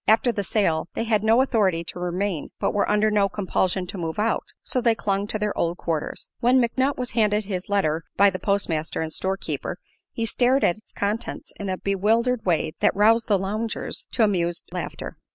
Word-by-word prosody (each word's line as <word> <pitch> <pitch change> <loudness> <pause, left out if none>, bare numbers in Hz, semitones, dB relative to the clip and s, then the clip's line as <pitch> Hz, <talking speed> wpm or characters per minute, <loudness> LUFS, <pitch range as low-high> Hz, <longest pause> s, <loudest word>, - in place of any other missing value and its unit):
After 225 +3 +4
the 205 -3 -2
sale 175 -5 +1
they - - -1
had 220 -2 +1
no 225 +4 +5
authority 195 -10 +1
to 170 - -7
remain 180 -1 -2
but - - 0
were 205 - +1
under 210 +1 +3
no 200 -1 +3
compulsion 190 -1 0
to 185 +1 -7
move 160 -1 -3
out, 220 +2 0 0.2
so 255 - -1
they 230 -2 +3
clung 200 -1 -1
to 215 - -2
their 210 -1 -1
old 170 +1 0
quarters. 160 -3 -3
When 250 +2 +4
McNutt 260 +3 +1
was 250 -1 -3
handed 210 -2 +2
his 190 -2 -4
letter 165 -6 +1
by 200 0 +6
the 185 - -5
postmaster 170 -6 -1
and 160 -1 -4
storekeeper 190 +1 -3 0.3
he 230 - -2
stared 250 +4 +2
at 175 - +3
its 215 - -17
contents 210 +3 -3
in 200 -2 -3
a 185 - -1
bewildered 225 +6 +1
way 160 -3 +1
that - - +3
roused 225 +3 +4
the 205 - +4
loungers 215 +4 -3
to 235 - +3
amused 175 -5 0
laughter. - - -5
205 Hz, 200 wpm, -24 LUFS, 185-225 Hz, 0.3 s, by